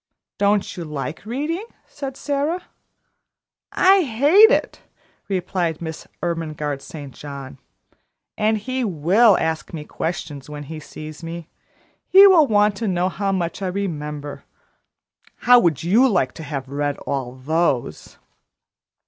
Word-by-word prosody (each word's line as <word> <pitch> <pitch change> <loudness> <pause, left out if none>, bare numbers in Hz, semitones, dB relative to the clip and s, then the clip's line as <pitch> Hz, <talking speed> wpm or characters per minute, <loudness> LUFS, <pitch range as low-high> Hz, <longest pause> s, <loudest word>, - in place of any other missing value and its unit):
"Don't 205 0 +1
you 175 - -5
like 150 +4 -6
reading?" 300 - -2 0.2
said 275 -2 -7
Sara. 295 +5 -1 1.1
"I 385 +1 +5
hate 300 - +6
it!" - - 0 0.5
replied 180 -4 -2
Miss 160 -1 -7 0.2
Ermengarde 155 -4 -3
St. 145 -6 -9
John. 140 -2 -9 0.8
"And 215 +1 +1
he 255 +4 -3
will 195 +3 +4
ask 160 +1 -2
me 155 - -6
questions 150 -5 -5
when 150 -1 -7
he 155 +2 -8
sees 155 +1 -10
me: 165 0 -7 0.6
he 390 +2 +8
will 350 -7 +6
want 210 -2 +3
to 225 - -2
know 180 -1 +1
how 195 +2 -2
much 180 0 -2
I 190 - -1
remember; 150 -6 -4 0.9
how 245 0 +6
would 170 - +1
you 225 +10 +4
like 155 - +1
to 160 - -10
have 140 -3 -5
to 135 - -16
read 145 0 -1
all 130 -3 -3
those?" 145 -1 -1
175 Hz, 135 wpm, -21 LUFS, 150-225 Hz, 1.1 s, he